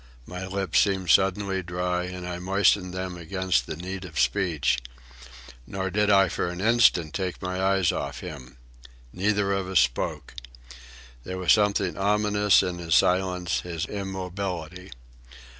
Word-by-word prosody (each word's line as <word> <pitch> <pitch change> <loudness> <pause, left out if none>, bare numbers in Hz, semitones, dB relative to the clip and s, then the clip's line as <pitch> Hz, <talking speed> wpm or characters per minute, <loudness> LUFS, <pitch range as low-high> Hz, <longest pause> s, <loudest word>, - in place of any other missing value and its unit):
My 90 +1 -7
lips 95 -2 0
seemed 95 -4 +1
suddenly 95 0 +2
dry 90 +1 -2
and 90 0 -7
I 90 0 -5
moistened 95 0 +2
them 95 -1 -5
against 95 +2 -1
the - - -4
need 95 +3 -6
of 80 -5 -6
speech. 85 -10 +1 0.9
Nor 95 -1 -3
did 105 +2 +1
I 95 -1 +5
for - - -2
an 90 0 -6
instant 100 -7 +3
take 95 -2 -3
my 95 0 -3
eyes 95 -2 +2
off 70 -2 -5
him. 65 -8 -9 0.6
Neither 100 +1 0
of 95 -1 -1
us 95 -2 +3
spoke. 65 -4 -1 0.9
There 95 +5 -5
was 90 -1 +4
something 100 -3 +1
ominous 105 0 +3
in 90 -1 -3
his 80 -2 0
silence, 90 +3 +2
his 85 -2 -4
immobility. 95 -3 -5
95 Hz, 145 wpm, -25 LUFS, 90-95 Hz, 0.9 s, I